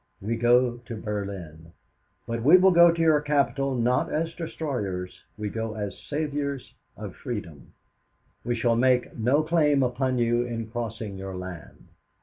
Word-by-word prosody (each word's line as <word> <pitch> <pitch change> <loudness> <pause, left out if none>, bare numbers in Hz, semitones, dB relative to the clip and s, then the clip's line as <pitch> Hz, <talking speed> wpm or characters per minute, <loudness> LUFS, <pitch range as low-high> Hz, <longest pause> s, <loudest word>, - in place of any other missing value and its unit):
We 110 +4 -2
go 120 +1 +3
to 120 -1 -8
Berlin. 95 -7 -6 0.5
But 115 0 -3
we 155 +10 +7
go 175 -2 +6
to 170 - -5
your 160 -2 +4
capital 140 -2 0
not 125 +1 +1
as 165 +1 -1
destroyers; 105 - -4 0.2
we 105 0 -3
go 110 0 -4
as 105 -2 -5
saviors 145 -2 -3 0.2
of 105 -3 -7
freedom. 105 - -7 0.7
"'"We 120 - -1
shall 115 0 +2
make 125 +1 +2
no 130 +7 +2
claim 150 -4 +3
upon 130 +1 0
you 120 0 +2
in 115 -2 -5
crossing 110 -4 -5
your 95 -1 -6
land. 90 -3 -9
120 Hz, 145 wpm, -26 LUFS, 105-140 Hz, 0.7 s, we